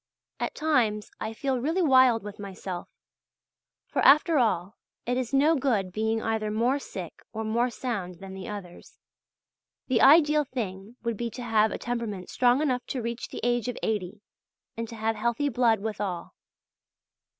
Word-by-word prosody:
At -, -, -3 dB
times 235 Hz, -9 st, +1 dB
I 220 Hz, -, -3 dB
feel 260 Hz, +3 st, -1 dB
really 325 Hz, +8 st, 0 dB
wild 255 Hz, -6 st, +5 dB
with 205 Hz, 0 st, -8 dB
myself; 190 Hz, -2 st, -6 dB, 1.0 s
for, -, -, -2 dB
after 305 Hz, +2 st, +6 dB
all, 205 Hz, -4 st, 0 dB, 0.3 s
it 245 Hz, -, 0 dB
is 250 Hz, -2 st, -2 dB
no 290 Hz, +4 st, +4 dB
good 235 Hz, -10 st, 0 dB
being 220 Hz, +3 st, -1 dB
either 220 Hz, -1 st, -1 dB
more 235 Hz, +6 st, +1 dB
sick 185 Hz, -, -8 dB
or 220 Hz, -, -3 dB
more 235 Hz, +3 st, +1 dB
sound 205 Hz, -8 st, -4 dB
than 190 Hz, +2 st, -10 dB
the 190 Hz, -1 st, -7 dB
others; 195 Hz, -4 st, -9 dB, 0.9 s
the 255 Hz, -4 st, +2 dB
ideal 300 Hz, +1 st, +6 dB
thing 220 Hz, -5 st, -5 dB
would 235 Hz, -3 st, -2 dB
be 235 Hz, +1 st, -2 dB
to 245 Hz, +2 st, -8 dB
have 220 Hz, -2 st, +3 dB
a -, -, -3 dB
temperament 230 Hz, -6 st, -4 dB
strong 250 Hz, +3 st, +3 dB
enough 250 Hz, -4 st, 0 dB
to 260 Hz, -, -3 dB
reach 235 Hz, +1 st, -4 dB
the -, -, -7 dB
age 240 Hz, -1 st, +1 dB
of 245 Hz, -, -3 dB
eighty 205 Hz, -1 st, -2 dB, 0.5 s
and 230 Hz, 0 st, -4 dB
to 230 Hz, -, -8 dB
have 220 Hz, 0 st, -1 dB
healthy 235 Hz, +6 st, 0 dB
blood 230 Hz, -4 st, +2 dB
withal. 205 Hz, -5 st, -4 dB
230 Hz, 165 wpm, -27 LUFS, 210-255 Hz, 1.0 s, after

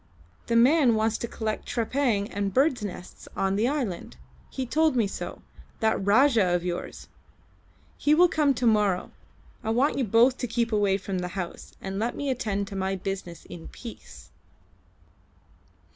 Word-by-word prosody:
The 235 Hz, -, 0 dB
man 250 Hz, 0 st, +5 dB
wants 220 Hz, 0 st, 0 dB
to 235 Hz, -, -3 dB
collect 220 Hz, -1 st, -4 dB
trepang 235 Hz, -3 st, 0 dB
and 200 Hz, 0 st, -2 dB
birds' 265 Hz, +1 st, +2 dB
nests 185 Hz, -2 st, -8 dB
on 195 Hz, 0 st, 0 dB
the 215 Hz, +4 st, +2 dB
islands. 255 Hz, -, -3 dB, 0.3 s
He 265 Hz, -, -4 dB
told 315 Hz, +3 st, +2 dB
me 235 Hz, -3 st, +3 dB
so, 200 Hz, -, -6 dB, 0.4 s
that 220 Hz, -3 st, +1 dB
Rajah 215 Hz, -3 st, +4 dB
of 175 Hz, -, -1 dB
yours. 175 Hz, -1 st, -5 dB, 0.9 s
He 295 Hz, +1 st, +4 dB
will 355 Hz, +3 st, +6 dB
come 295 Hz, -5 st, +2 dB
to 245 Hz, -, -1 dB
morrow. 210 Hz, -5 st, +2 dB, 0.5 s
I 220 Hz, -, -2 dB
want 255 Hz, +6 st, +2 dB
you -, -, +2 dB
both 235 Hz, +4 st, +4 dB
to 245 Hz, -, -2 dB
keep 230 Hz, 0 st, -1 dB
away 205 Hz, -2 st, +2 dB
from 195 Hz, -1 st, -4 dB
the 180 Hz, -, -3 dB
house, 175 Hz, -2 st, -6 dB
and 195 Hz, 0 st, -5 dB
let 235 Hz, +2 st, -1 dB
me 285 Hz, -1 st, -2 dB
attend 205 Hz, -5 st, -2 dB
to 200 Hz, -, -7 dB
my 190 Hz, 0 st, -1 dB
business 185 Hz, -2 st, -6 dB
in 165 Hz, -2 st, -10 dB
peace." 235 Hz, -2 st, -11 dB
220 Hz, 165 wpm, -26 LUFS, 195-255 Hz, 0.9 s, will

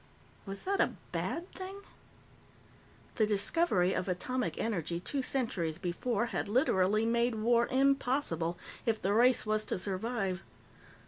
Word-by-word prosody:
Was 195 Hz, 0 st, -5 dB
that 395 Hz, +1 st, +1 dB
a -, -, +1 dB, 0.2 s
bad 345 Hz, +3 st, -3 dB
thing? 385 Hz, +1 st, -7 dB, 1.4 s
The 215 Hz, -3 st, +3 dB
discovery 205 Hz, -, +2 dB
of 185 Hz, -, -2 dB
atomic 250 Hz, +8 st, -2 dB
energy, 175 Hz, -6 st, -2 dB
two 275 Hz, +9 st, -2 dB
centuries 190 Hz, -, -1 dB
before, 205 Hz, +6 st, -1 dB
had -, -, -1 dB
literally 210 Hz, -3 st, +2 dB
made 235 Hz, +1 st, +1 dB
war 235 Hz, +2 st, +3 dB
impossible, 260 Hz, -, +1 dB, 0.3 s
if 220 Hz, -1 st, +2 dB
the 195 Hz, +2 st, 0 dB
race 240 Hz, +2 st, +4 dB
was 215 Hz, 0 st, +1 dB
to -, -, -1 dB
survive. 195 Hz, 0 st, -1 dB
225 Hz, 130 wpm, -32 LUFS, 190-255 Hz, 1.4 s, race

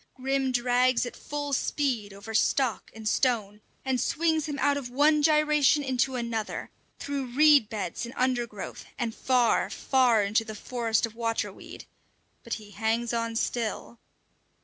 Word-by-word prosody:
Grim 270 Hz, 0 st, 0 dB
drags 250 Hz, 0 st, +2 dB
at 245 Hz, -, -7 dB
full 290 Hz, -1 st, -5 dB
speed 250 Hz, -7 st, -1 dB
over 200 Hz, +3 st, -9 dB
stock 245 Hz, +2 st, +1 dB
and 220 Hz, -1 st, -6 dB
stone, 215 Hz, -4 st, 0 dB, 0.2 s
and 260 Hz, -2 st, 0 dB
swings 320 Hz, -1 st, 0 dB
him 290 Hz, -2 st, -4 dB
out 285 Hz, +1 st, +2 dB
of 275 Hz, -4 st, -4 dB
one 295 Hz, +4 st, +3 dB
gyration 300 Hz, -1 st, +3 dB
into 260 Hz, 0 st, 0 dB
another; 235 Hz, -3 st, -4 dB, 0.3 s
through 280 Hz, -2 st, -4 dB
reed 295 Hz, -6 st, +6 dB
beds 200 Hz, -6 st, -4 dB
and 235 Hz, +2 st, -7 dB
undergrowth, 240 Hz, -5 st, -2 dB
and 235 Hz, -2 st, -2 dB
far, 250 Hz, -1 st, +2 dB
far 250 Hz, -5 st, +2 dB
into 210 Hz, +3 st, +1 dB
the 220 Hz, -1 st, -8 dB
forest 230 Hz, 0 st, -1 dB
of 225 Hz, -, -10 dB
water 230 Hz, -1 st, -2 dB
weed; -, -, -11 dB, 0.6 s
but 235 Hz, -, -3 dB
he 210 Hz, -2 st, -12 dB
hangs 225 Hz, +3 st, -1 dB
on 230 Hz, -1 st, -2 dB
still! 230 Hz, 0 st, -3 dB
245 Hz, 150 wpm, -27 LUFS, 225-275 Hz, 0.6 s, reed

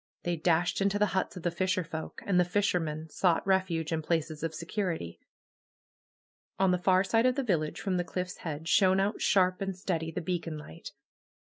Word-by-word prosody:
They 175 Hz, 0 st, 0 dB
dashed 170 Hz, +2 st, +1 dB
into 200 Hz, +1 st, +2 dB
the 210 Hz, -, +4 dB
huts 190 Hz, -1 st, -1 dB
of 175 Hz, -, -8 dB
the 175 Hz, -, +1 dB
fisherfolk. 175 Hz, -3 st, -3 dB
And 185 Hz, -3 st, +3 dB
the -, -, +6 dB
fishermen 170 Hz, -5 st, -1 dB
sought 175 Hz, 0 st, +2 dB
refuge 185 Hz, -5 st, +1 dB
in 160 Hz, -1 st, 0 dB
places 160 Hz, -1 st, -1 dB
of 165 Hz, 0 st, -3 dB
security. 165 Hz, -, -3 dB, 1.4 s
On 190 Hz, -1 st, +3 dB
the 180 Hz, -, +1 dB
far 185 Hz, 0 st, +4 dB
side 225 Hz, +5 st, +3 dB
of 255 Hz, -, +2 dB
the 275 Hz, -, 0 dB
village 165 Hz, -9 st, 0 dB
from 190 Hz, -2 st, -1 dB
the 175 Hz, -, 0 dB
cliff^s 180 Hz, +1 st, -4 dB
head 160 Hz, -1 st, -6 dB
shone 190 Hz, 0 st, +4 dB
out 200 Hz, +2 st, 0 dB
shar}) 185 Hz, -2 st, +3 dB
and 195 Hz, -2 st, -3 dB
steady 165 Hz, -4 st, -2 dB
the 165 Hz, -, -4 dB
beacon 165 Hz, -2 st, -3 dB
light. 115 Hz, -, -10 dB
180 Hz, 190 wpm, -30 LUFS, 165-190 Hz, 1.4 s, the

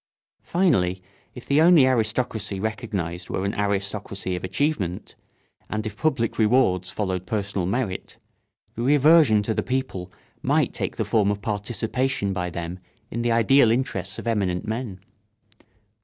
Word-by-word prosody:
Finally, 95 Hz, -, +1 dB, 0.3 s
if 125 Hz, -, -10 dB
the 140 Hz, +2 st, +3 dB
only 165 Hz, -4 st, +7 dB
aristocracy 110 Hz, -4 st, 0 dB
recognised 95 Hz, -4 st, -4 dB
were 95 Hz, -, -2 dB
an 100 Hz, -, -1 dB
aristocracy 100 Hz, -1 st, -2 dB
of 90 Hz, -, -6 dB
achievement, 95 Hz, -, -2 dB, 0.5 s
and 110 Hz, 0 st, -3 dB
if 105 Hz, -1 st, -5 dB
public 130 Hz, -6 st, 0 dB
rewards 105 Hz, -6 st, +3 dB
followed 95 Hz, -3 st, -3 dB
personal 100 Hz, -4 st, -2 dB
merit, 100 Hz, -3 st, -3 dB, 0.6 s
the 115 Hz, -, -5 dB
reversion 145 Hz, -4 st, +5 dB
to 110 Hz, -, 0 dB
the -, -, 0 dB
people 125 Hz, -9 st, -3 dB, 0.3 s
might -, -, +1 dB
take -, -, -3 dB
the -, -, -2 dB
form 105 Hz, -3 st, +2 dB
of 105 Hz, 0 st, -1 dB
participation 110 Hz, +2 st, -1 dB
by 90 Hz, -1 st, -2 dB
them 85 Hz, +1 st, -5 dB, 0.3 s
in 120 Hz, -, -2 dB
the 120 Hz, 0 st, +1 dB
ideal 115 Hz, +2 st, +5 dB
interests 100 Hz, -6 st, -1 dB
of -, -, -7 dB
eminent 100 Hz, -6 st, 0 dB
men. 110 Hz, -4 st, -4 dB
105 Hz, 140 wpm, -24 LUFS, 95-125 Hz, 0.6 s, only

